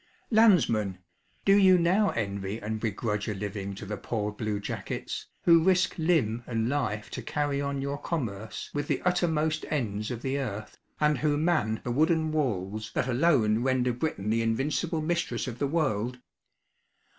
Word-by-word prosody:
Landsmen! 130 - +4 0.5
do 195 - +6
you 190 -2 +6
now 185 +4 +3
envy 100 -1 -3
and 110 +1 -3
begrudge 105 -1 -2
a 105 - -2
living 100 0 -4
to 100 - -8
the 105 +1 -4
poor 105 -1 -2
blue 105 -1 -3
jackets, 105 - -5 0.2
who 165 -2 +6
risk 185 0 +3
limb 135 -9 +1
and 115 -2 -1
life 125 -6 -2
to 130 - -5
carry 140 +3 -1
on 140 -1 -2
your 140 +1 -3
commerce 110 - -4
with 145 0 -2
the - - 0
uttermost 160 -4 +1
ends 110 -8 -2
of 120 -2 -5
the 135 +1 -1
earth, 110 -5 -5 0.2
and 150 0 +2
who 150 -1 +1
man 155 -9 +1
the 120 - -2
wooden 160 +4 +2
walls 110 -7 -2
that - - +1
alone 120 -5 +3
render 125 -1 +1
Britain 120 -6 -2
the 115 +1 +2
invincible 150 +8 0
mistress 165 -7 -1
of 120 -2 -6
the 140 - +1
world? 125 -6 0
125 Hz, 165 wpm, -28 LUFS, 110-155 Hz, 0.5 s, do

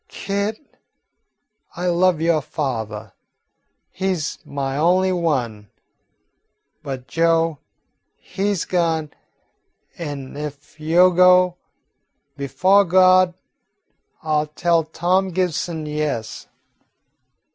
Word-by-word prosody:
Kit, 200 +7 -5 1.0
I 175 +2 -4
love 175 -1 +2
yo' 165 -2 +2
fathah; 115 -8 -5 0.8
he 190 0 -1
's 155 -3 -4
my 135 -1 -4
only 180 +5 +2
one. 125 - -2 1.1
But 130 -2 -7
Joe, 165 +1 +1 0.6
he 200 +2 -3
's 195 - -2
gone, 165 -4 -1 0.9
an' 145 -5 -6
ef 150 +1 -8
yo 170 +4 +4
go, 180 0 +5 0.8
befo' 150 +9 +3
Gawd 185 0 +4 0.9
I 155 -1 +1
'll 150 - -2
tell 165 +2 +1
Tawm 180 +4 0
Gibson 175 -3 -2
yes." 150 -7 -4
165 Hz, 90 wpm, -21 LUFS, 150-185 Hz, 1.1 s, go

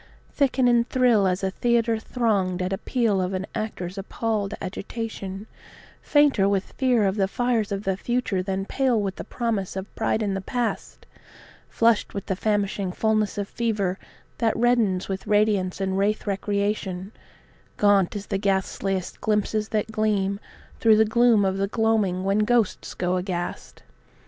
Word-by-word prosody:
Thicken 265 -3 +2
and 240 0 +3
thrill 240 -6 +3
as 185 +1 -1
a 190 - 0
theatre 235 +1 +1
thronged 205 -7 0
at 185 +1 -2
appeal 215 -1 0
of 185 +1 -2
an 185 +1 -3
actor's 200 -4 -4
appalled 210 0 -2
agitation, 200 0 -5 0.6
Fainter 285 -10 +3
with 195 -1 -1
fear 250 -5 +2
of 195 +2 0
the 195 -1 +2
fires 235 -1 0
of 200 0 -2
the 190 -2 0
future 240 -2 -1
than 195 +1 -2
pale 255 0 +1
with 195 -2 -3
the - - -5
promise 220 -7 -2
of 190 +1 -6
pride 220 0 0
in 200 -2 -1
the 195 - -2
past; 240 +3 -3 0.6
Flushed 230 -3 +2
with 200 - -4
the 190 - -1
famishing 200 -2 -1
fullness 215 +1 0
of 200 -1 -2
fever 205 -6 -1 0.4
that 225 -2 +1
reddens 225 -6 +2
with 190 -1 -5
radiance 205 -3 +2
and 190 0 -1
rathe* 210 +2 0
recreation, 200 -1 -2
[speedy] - - -30
Gaunt 205 -2 +3
as 205 -1 -5
the 195 - -2
ghastliest 195 -1 -1
of - - -34
glimpses 215 0 0
that 215 0 -1
gleam 205 -2 0 0.4
through 220 -2 +5
the 220 - +5
gloom 225 -1 +4
of 190 0 0
the 195 0 0
gloaming 210 -4 +1
when 195 +2 +1
ghosts 225 -1 +1
go 180 0 0
aghast? 180 -1 -5
205 Hz, 165 wpm, -24 LUFS, 195-225 Hz, 0.6 s, through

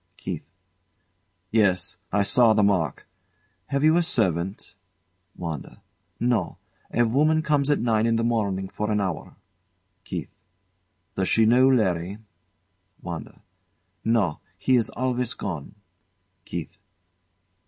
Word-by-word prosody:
KEITH. 80 -6 -6 1.0
Yes. 95 -5 +2
I 100 +1 +3
saw 115 +2 +5
the 105 - +4
mark. 90 -8 +1 0.6
Have 140 0 -1
you 155 +2 +5
a - - +4
servant? 95 - 0 0.6
WANDA. 80 -5 -6 0.4
No. 120 -1 0 0.3
A 120 - +3
woman 155 +7 +3
come 150 -2 +2
at 145 - +4
nine 115 -1 +2
in 115 - +2
the 115 - +1
morning 100 -5 0
for 105 +2 -3
an 105 -1 +1
hour. 95 -5 -3 0.7
KEITH. - - -6 0.8
Does 95 -1 -1
she 115 - +4
know 125 +4 +5
Larry? 95 -6 +1 0.9
WANDA. 85 -4 -7 0.6
No. 110 -9 +1 0.2
He 130 +7 +2
is 120 -3 +2
always 125 -1 -1
gone. 85 -3 -5 0.7
KEITH. 85 -3 -6
110 Hz, 120 wpm, -25 LUFS, 95-125 Hz, 1.0 s, saw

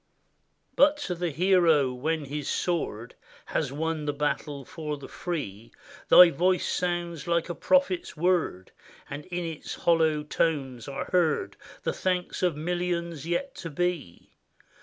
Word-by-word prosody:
But 290 +1 +5
to 180 - -2
the 175 0 -2
hero, 165 -5 +3
when 155 +4 -2
his 145 +1 -4
sword 125 -10 -2 0.3
Has - - -1
won 155 +1 -2
the 145 - +1
battle 145 -1 -2
for 150 0 -5
the 140 - -10
free, 115 - -5 0.4
Thy 180 -1 +9
voice 180 +2 +1
sounds 175 -2 -2
like 170 0 +1
a - - -1
prophet's 280 - +1
word; 165 - 0 0.4
And 145 +1 -6
in 180 -1 -3
its 160 -2 -6
hollow 160 -3 +2
tones 140 -6 -1
are 135 -1 -4
heard 175 -5 +1 0.3
The - - 0
thanks 180 -1 -2
of 180 -4 +2
millions 170 -1 -2
yet 265 +11 -1
to 165 - -6
be. 165 - -3
165 Hz, 140 wpm, -27 LUFS, 145-180 Hz, 0.4 s, Thy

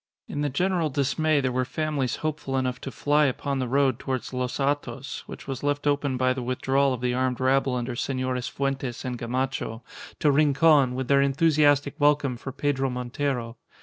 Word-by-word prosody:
In 145 - -4
the 145 - 0
general 175 +3 0
dismay 145 +2 +1
there 130 -1 0
were 130 +1 0
families 140 -1 -2
hopeful 150 -3 -2
enough 130 -1 -1
to - - -5
fly 145 +5 +2
upon 140 +1 -1
the 130 - -1
road 135 -1 +2
towards 130 -1 -4
Los 125 0 -2
Hatos, 140 -1 -2
which - - -10
was 135 -2 -4
left 145 0 -1
open 145 -2 +1
by 130 0 +2
the 130 - -4
withdrawal 135 +2 +1
of 125 -2 -3
the 125 -1 0
armed 130 0 0
rabble 130 0 +2
under 120 0 -3
Senores 130 -1 -2
Fuentes 135 -3 -3
and 125 -2 -3
Gamacho, 125 -1 -3 0.3
to 150 - +3
Rincon, 140 -2 +4
with 130 -1 -3
their 140 +1 +4
enthusiastic 145 0 +3
welcome 145 -3 +3
for 135 +3 -7
Pedro 135 0 0
Montero. 125 -1 -3
135 Hz, 180 wpm, -26 LUFS, 125-145 Hz, 0.3 s, Rincon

